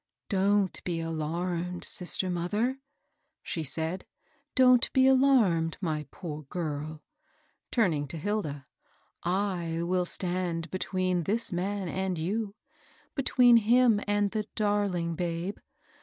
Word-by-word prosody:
" - - -61
Don't 195 -4 +1
be 170 -2 -2
alarmed, 170 +2 -3
sister 180 +1 +1
mother," 210 +10 -1 0.6
she 165 - -3
said 160 +6 -3 0.2
— - - -40
"don't 250 -2 +5
be 260 0 +5
alarmed, 250 - +4
my 155 -5 -2
poor 155 -1 -7
girl," 155 -1 -4 0.7
turning 165 - +1
to 150 - -6
Hilda; 155 -6 -3 0.4
" - - -37
I 175 -3 -1
will 180 +1 +1
stand 175 -2 -2
between 185 -2 -1
this 220 0 -1
man 190 +2 -2
and 190 0 -2
you 200 +5 -2 0.3
— - - -31
between 250 -3 +5
him 230 -1 +4
and 205 -1 +1
the 215 -1 -2
darling 205 -5 0
babe. 170 +3 -3
185 Hz, 125 wpm, -29 LUFS, 165-205 Hz, 0.7 s, don't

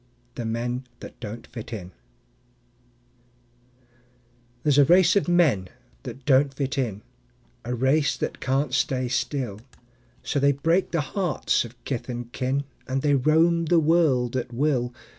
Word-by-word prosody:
The 120 - -5
Men 120 +3 -3
That - - -11
Don't 115 0 -7
Fit 115 -1 -9
In 95 -5 -6 2.7
There's 145 -2 +4
a - - +8
race 180 +3 +5
of 200 - +2
men 150 - +3 0.3
that 135 - -9
don't 140 0 +4
fit 135 +1 -3
in, 110 -7 -2 0.6
A 125 +1 -3
race 135 +4 +2
that - - -4
can't 135 +1 0
stay 130 -1 0
still; 120 -4 -2 0.6
So 140 - -1
they 140 +1 +4
break 165 +7 +1
the 165 - 0
hearts 170 -2 0
of 120 +1 -11
kith 130 -2 -4
and 120 -1 -5
kin, 130 +2 -1 0.2
And 130 +1 -2
they 145 -1 +3
roam 160 +5 +3
the 170 +2 +3
world 150 -7 +2
at 125 -1 -2
will. 125 -1 0
135 Hz, 145 wpm, -25 LUFS, 120-150 Hz, 2.7 s, a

